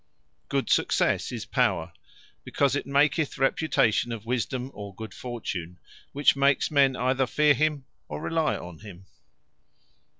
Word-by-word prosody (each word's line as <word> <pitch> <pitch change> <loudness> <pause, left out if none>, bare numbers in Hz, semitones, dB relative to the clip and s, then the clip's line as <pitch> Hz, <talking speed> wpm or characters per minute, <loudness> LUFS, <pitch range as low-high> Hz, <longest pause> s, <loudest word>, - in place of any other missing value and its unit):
Good - - -1
successe - - +1
is - - -5
Power; - - 0 0.5
because 140 -1 +1
it 145 - -3
maketh 140 +2 +2
reputation 130 -4 +1
of 115 -2 -6
Wisdome, 125 +2 -2
or 100 -1 -9
good 110 -1 -8
fortune; 90 -8 -6 0.3
which 145 +1 +3
makes 140 +1 +2
men 140 -3 +4
either 130 +1 +1
feare 150 +2 +4
him, 150 -2 0 0.2
or 75 - -6
rely 160 -2 0
on 85 -2 -10
him. 95 -3 -12
130 Hz, 135 wpm, -26 LUFS, 110-140 Hz, 0.5 s, men